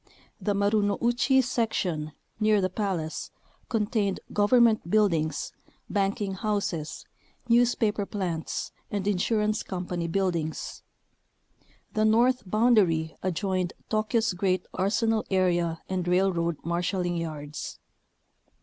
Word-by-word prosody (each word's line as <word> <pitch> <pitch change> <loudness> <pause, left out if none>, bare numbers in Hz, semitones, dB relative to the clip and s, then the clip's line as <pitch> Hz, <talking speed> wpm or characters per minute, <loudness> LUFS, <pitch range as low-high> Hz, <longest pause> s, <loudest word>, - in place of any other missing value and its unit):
The 205 -1 0
Marounouchi 220 +6 +2
Sec 235 -3 0
tion, 155 -4 -2 0.3
near 215 -1 +4
the 185 -1 0
palace, 185 -6 -2 0.4
contained 210 -3 0
government 215 -2 +4
buildings, 165 -8 +1 0.4
banking 200 0 0
houses, 190 -6 -2 0.4
newspaper 230 -4 +2
plants, 175 -5 -3 0.2
and 200 -2 -2
insurance 210 +2 +1
company 180 -2 -3
buildings. 170 -3 -2 1.1
The 215 - +1
north 240 +4 +4
boundary 195 -8 +3
adjoined 185 0 -1 0.2
Tokyo's 215 0 +1
great 185 0 0
arsenal 220 +3 +1
area 175 -3 +1
and 185 -2 -2
railroad 175 -3 +2
marshalling 175 +1 -1
yards. 150 -3 -5
195 Hz, 95 wpm, -27 LUFS, 175-215 Hz, 1.1 s, near